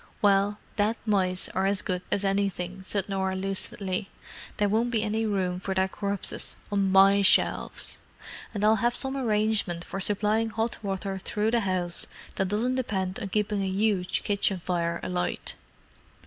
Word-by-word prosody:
"Well, 205 -1 +3 0.2
dead 210 +2 +2
mice 185 -4 +2
are 190 +1 0
as 195 -1 0
good 180 -1 -2
as 200 - +1
anything," 195 -2 -1
said 200 -2 -1
Norah 190 -1 -1
lucidly. 195 0 -1 0.5
"There 205 - +2
won't 225 +4 +1
be 225 -3 0
any 220 +1 0
room 185 -3 -1
for 190 0 -3
their 190 0 +2
corpses 200 0 -2 0.2
on 200 -2 +1
my 195 +1 +6
shelves. 195 - +2 0.5
And 210 -2 -3
I'll 220 +1 +5
have 240 +3 +1
some 265 0 -2
arrangement 215 -8 +1
for 195 - -6
supplying 210 +3 +1
hot 225 +1 -2
water 195 0 -3
through 210 +3 -1
the 235 - +3
house 185 -4 -1 0.3
that 190 - 0
doesn't 220 +6 0
depend 195 -7 -2
on 200 - -4
keeping 210 0 0
a 195 - -1
huge 190 -1 +1
kitchen 200 -2 0
fire 170 -1 -1
alight." 180 -1 -2
200 Hz, 160 wpm, -27 LUFS, 190-215 Hz, 0.5 s, my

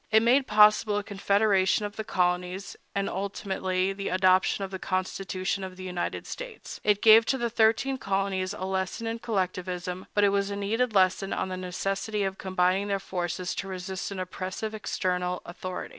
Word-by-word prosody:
It 220 0 +5
made 255 +3 +4
possible 210 0 +5
a 205 - -1
confederation 200 0 +2
of 205 0 -6
the 220 - -4
colonies, 180 0 -1 0.2
and, 200 0 0
ultimately, 190 -1 -2
the 195 0 -4
adoption 185 +1 +3
of 195 - -5
the 190 - -5
Constitution 185 +1 -2
of 185 -1 -7
the 185 - -8
United 180 -1 -3
States. - - -8
It 205 -1 +2
gave 225 0 +9
to 265 - +2
the 235 -2 -2
thirteen 230 +4 +2
colonies 195 -2 -1
a 185 - -4
lesson 190 +4 -2
in 225 0 -3
collectivism, 185 -3 -3
but 205 - +4
it 200 - +6
was 200 0 +1
a 200 - -3
needed 220 +3 0
lesson 190 +1 +3
on 190 - -2
the 185 - -3
necessity 195 +3 -2
of 195 0 -3
combining 185 +1 +1
their 200 -1 +1
forces 180 -1 -3
to 195 - -4
resist 185 0 -4
an 200 -2 -6
oppressive 185 +4 -4
external 180 -3 -2
authority. 185 +1 -6
195 Hz, 180 wpm, -27 LUFS, 185-210 Hz, 0.2 s, gave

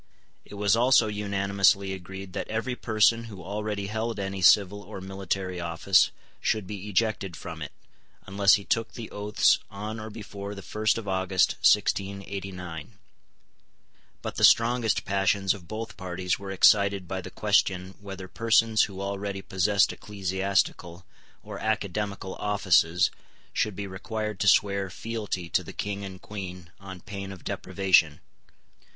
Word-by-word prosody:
It - - -11
was 100 +1 +3
also 120 0 +5
unanimously 100 -2 +1
agreed 95 0 -8
that - - -4
every 115 +3 -2
person 115 0 +2
who 100 -5 -10
already 105 +1 -3
held 110 +2 -3
any 95 -1 -3
civil 100 +2 +5
or 95 0 -9
military 95 -1 -3
office 85 +3 +3 0.3
should 110 -3 0
be 100 +1 -7
ejected 105 -3 0
from - - -8
it, - - -5 0.5
unless 100 +1 +4
he 100 - -4
took 115 -1 -1
the 115 -3 -8
oaths 105 0 +2
on 105 +3 -6
or 110 0 -6
before 105 -2 -7
the 100 - -9
first 110 +5 0
of 110 -3 -6
August 95 -1 +2
1689. 95 -4 0 1.3
But - - -5
the - - -1
strongest 115 -1 +4
passions 95 0 +2
of 90 -5 -12
both 110 +3 -6
parties 90 -1 -2
were 100 -1 -7
excited 100 0 +4
by 95 +1 -3
the - - -8
question 95 0 +1
whether 95 -2 -8
persons 115 +1 +3
who 95 -2 -8
already 100 0 -4
possessed 100 +2 +2
ecclesiastical 95 -3 -2 0.4
or - - -8
academical 105 -2 -2
offices 90 -4 +3 0.4
should 105 -3 0
be 100 - -4
required 105 +2 -4
to 100 - +1
swear 100 0 +3
fealty 105 -1 -4
to - - +1
the - - -9
King 100 0 -4
and 95 -1 -8
Queen 90 -4 -8
on 95 -2 -9
pain 100 -1 -7
of 95 -3 -11
deprivation. 95 -6 +2
100 Hz, 145 wpm, -27 LUFS, 95-105 Hz, 1.3 s, also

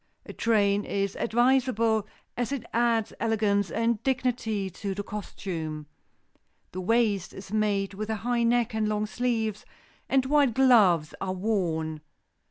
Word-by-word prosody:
A - - -9
train 205 -3 +2
is 200 -1 -2
advisable, 235 -3 +2 0.3
as 245 +2 -2
it 270 -5 -3
adds 230 -2 +1
elegance 210 -3 +1
and 230 -1 0
dignity 245 -6 -1
to 195 +2 -5
the 205 - -3
costume. 165 -7 -5 0.9
The 185 - -5
waist 210 -2 +1
is 195 +1 -9
made 205 -2 0
with 215 +2 -5
a 220 - 0
high 240 -1 +1
neck 235 0 +2
and 215 -1 0
long 210 0 0
sleeves 220 -2 -2 0.5
and 265 -1 +3
white 280 -4 +3
gloves 205 -12 +4
are 185 -1 -2
worn. 170 -6 -1
215 Hz, 140 wpm, -27 LUFS, 195-235 Hz, 0.9 s, gloves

